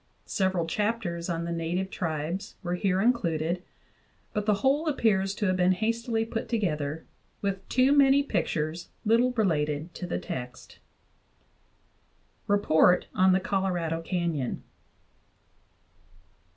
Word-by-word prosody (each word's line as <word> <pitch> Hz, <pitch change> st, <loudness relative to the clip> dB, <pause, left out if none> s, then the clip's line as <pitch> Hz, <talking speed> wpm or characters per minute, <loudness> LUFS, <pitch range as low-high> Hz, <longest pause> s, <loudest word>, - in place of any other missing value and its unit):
Several 190 Hz, -3 st, 0 dB
chapters 190 Hz, -2 st, -2 dB
on 170 Hz, 0 st, -2 dB
the 170 Hz, -, -3 dB
native 170 Hz, +3 st, -2 dB
tribes 165 Hz, +2 st, -3 dB
were 175 Hz, -1 st, -2 dB
here 185 Hz, +1 st, +1 dB
included; 175 Hz, -7 st, +1 dB, 0.7 s
but 210 Hz, 0 st, -2 dB
the 210 Hz, -, +4 dB
whole 290 Hz, +4 st, +3 dB
appears 200 Hz, -9 st, +1 dB
to 210 Hz, -, -2 dB
have 185 Hz, -1 st, +2 dB
been 180 Hz, 0 st, +4 dB
hastily 225 Hz, +3 st, -1 dB
put 225 Hz, 0 st, -4 dB
together, 160 Hz, -9 st, -1 dB, 0.4 s
with 195 Hz, -1 st, -3 dB
too 255 Hz, +2 st, +4 dB
many 280 Hz, 0 st, +5 dB
pictures 170 Hz, -, -2 dB, 0.2 s
little 235 Hz, +4 st, +4 dB
related 160 Hz, -6 st, 0 dB
to 180 Hz, -, -6 dB
the -, -, -2 dB
text. 125 Hz, -1 st, -7 dB, 1.7 s
REPORT 180 Hz, -3 st, +4 dB
ON 185 Hz, 0 st, +4 dB
THE 185 Hz, -, +4 dB
COLORADO 180 Hz, -4 st, -1 dB
CANYON. 165 Hz, -7 st, -2 dB
185 Hz, 120 wpm, -27 LUFS, 165-215 Hz, 1.7 s, many